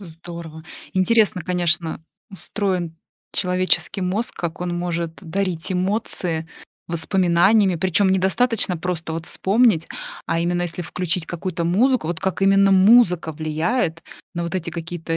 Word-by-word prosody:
Здорово! 165 -2 -9 0.3
Интересно, 205 -1 +3
конечно, 175 -3 0 0.3
устроен 185 -4 -3 0.4
человеческий 185 +1 0
мозг, 190 +6 0
как 170 +1 -5
он 175 -1 -2
может 170 -1 -3
дарить 185 0 -2
эмоции 180 -4 -1 0.4
воспоминаниями, 180 +4 +3
причем 190 +3 +2
недостаточно 190 +1 +1
просто 165 -1 -3
вот 165 +1 -5
вспомнить, 205 -4 +2 0.4
а 165 - 0
именно 175 +1 0
если 175 0 -3
включить 175 -1 -2
какую-то 175 0 -4
музыку, 225 +4 +2
вот 170 -1 -3
как 190 0 -2
именно 195 0 +5
музыка 190 -4 +5
влияет 160 +4 -1 0.3
на 170 - -2
вот 170 +2 -5
эти 170 -2 -2
какие-то 165 0 -4
180 Hz, 125 wpm, -21 LUFS, 165-195 Hz, 0.4 s, именно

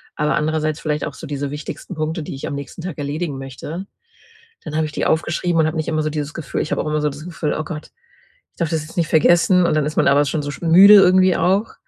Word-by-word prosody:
aber 150 +2 0
andererseits 155 -1 -1
vielleicht 150 -1 -2
auch - - -6
so - - -9
diese 145 -1 -4
wichtigsten 150 +5 -7
Punkte, 155 +1 -3
die 145 - -7
ich 135 - -6
am - - -4
nächsten 140 +5 -8
Tag 180 -5 -6
erledigen 145 0 -3
möchte. 150 +8 -7 0.8
Dann 155 -2 -6
habe 160 0 +1
ich 155 - -6
die - - -2
aufgeschrieben 165 +1 0
und 155 - +2
habe 155 +1 -3
nicht 155 - -2
immer 155 -1 0
so 155 - -1
dieses 150 -1 -4
Gefühl 160 -5 -4
ich - - -5
habe - - 0
auch - - -5
immer 150 0 0
so 150 - +1
das 145 +2 -10
Gefühl: 170 -3 -3
„Oh - - -2
Gott, 155 0 -8 0.6
ich - - -33
darf 170 - 0
das 160 -2 -1
jetzt 155 - -12
nicht 170 -3 0
vergessen”, 175 +3 +4
und 155 - +1
dann 150 -1 +1
ist 150 - -4
man - - +3
aber 145 +1 +4
schon 150 +2 -2
so 145 - -4
sch 145 - -9
müde 185 +5 +8
irgendwie 185 -2 +6
auch 195 +5 +1
155 Hz, 270 wpm, -20 LUFS, 150-170 Hz, 0.8 s, müde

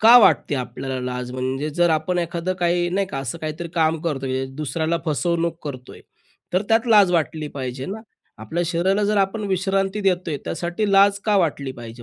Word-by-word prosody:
का 230 +3 +9
वाटते 170 -9 +4
आपल्याला 130 0 -4
लाज 125 0 -4
म्हणजे? 130 +4 -2
जर 175 +2 +2
आपण 160 +3 0
एखादं 175 +1 -2
काही 175 0 +2
नाही 195 +1 0
का 135 - -5
असं 135 +4 -4
काहीतरी 160 +2 -5
काम 160 -1 +2
करतो, 140 -5 -2
म्हणजे 130 0 -1
दुसऱ्याला 160 +3 -1
फसवणूक 165 +2 0
करतोय. 130 -3 -8 0.5
तर 185 +3 +2
त्यात 225 +1 +3
लाज 205 -5 +6
वाटली 155 -2 0
पाहिजे 130 0 -4
ना? 210 +3 -5 0.4
आपल्या 110 +11 -2
शरीराला 185 +5 +1
जर 210 +1 +1
आपण 195 +3 0
विश्रांती 195 +1 0
देतोय 180 -5 0
त्यासाठी 175 +5 -2
लाज 200 0 +5
का 210 -2 +3
वाटली 145 -7 0
पाहिजे 120 -1 -10
170 Hz, 180 wpm, -22 LUFS, 140-190 Hz, 0.5 s, का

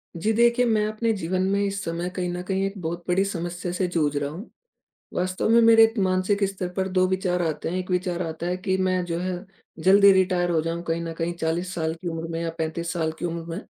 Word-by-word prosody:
जी 195 +7 0
देखिए, 235 +2 +4
मैं 215 -3 +2
अपने 215 +2 0
जीवन 185 -1 -2
में 200 0 +1
इस 200 0 -2
समय 170 +2 -3
कहीं 180 -1 -2
न 180 - -4
कहीं 190 +1 -1
एक 195 - -3
बहुत 170 +1 -4
बड़ी 185 +2 +3
समस्या 175 -2 -4
से 180 +1 -1
जूझ 155 -4 0
रहा 145 0 -1
हूँ। 175 +10 -9 0.7
वास्तव 185 +2 -1
में 230 +1 +6
मेरे 225 0 +8
द - - 0
मानसिक 185 +2 +1
स्तर 190 -2 -3
पर 190 0 0
2 185 0 +2
विचार 185 -1 0
आते 160 -3 -2
हैं, 180 +3 -2
1 185 0 -5
विचार 180 -1 0
आता 165 0 -4
है 180 +1 0
कि 185 +1 -1
मैं 185 -1 +1
जो 170 -1 -3
है 180 +1 -3 0.4
जल्दी 200 +1 +7
रिटायर 185 -2 +2
हो 165 -2 +2
जाऊँ 165 +1 -3
कहीं 165 +1 0
न 165 -1 -4
कहीं 165 +1 -1
40 170 +3 -2
साल 160 -1 -1
की 180 - -2
उम्र 165 0 -4
में 165 0 -3
या 165 - -1
35 165 +1 -2
साल 160 -2 -1
की - - -6
उम्र 170 -1 -3
में। 185 - -4
180 Hz, 245 wpm, -25 LUFS, 170-190 Hz, 0.7 s, मेरे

